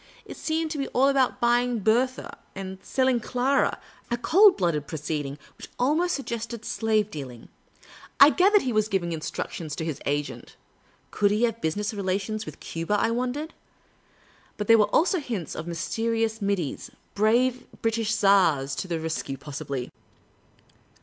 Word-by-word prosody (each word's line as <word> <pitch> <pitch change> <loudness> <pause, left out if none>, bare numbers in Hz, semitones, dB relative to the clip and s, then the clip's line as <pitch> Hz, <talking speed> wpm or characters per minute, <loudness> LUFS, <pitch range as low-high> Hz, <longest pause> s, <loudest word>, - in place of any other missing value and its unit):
It - - -9
seemed 320 0 -2
to 305 - -3
be 275 - -1
all 270 +2 +5
about 270 -2 +2
buying 240 0 +2
Bertha 245 +5 +1 0.2
and 190 -1 -6
selling 260 -2 +1
Clara 255 +4 +1 0.2
— - - -28
a 240 - 0
cold 385 - +5
blooded 165 -6 0
proceeding 150 -2 -4 0.2
which - - -10
almost 315 +8 +2
suggested 235 -4 -5
slave 215 -2 0
dealing. 130 - -8 0.7
I 280 +2 +9
gathered 395 +4 +4
he 250 - -1
was 215 0 +2
giving 190 -5 -1
instructions 155 -1 -5
to 160 - -4
his 160 -4 -4
agent: 145 +1 -3 0.6
could 205 - +2
he 210 +3 +1
have 230 -1 0
business 205 +7 -1
rela 195 -2 -1
tions 215 +2 -5
with - - -9
Cuba? 165 +5 -2
I 230 - +1
wondered. 255 +6 -2 1.0
But 210 - -2
there 225 +1 +6
were 210 - +6
also 365 +3 +3
hints 225 - -4
of 160 - -6
mysterious 225 +6 -1
middies 195 -7 -2
— - - -39
brave 240 +5 +2 0.2
British 225 -1 0
tars 165 -9 +3
to - - -3
the 170 -2 -2
re.s 160 0 -2
cue, 135 - -6
possibly 140 -2 -5
215 Hz, 165 wpm, -26 LUFS, 170-250 Hz, 1.0 s, I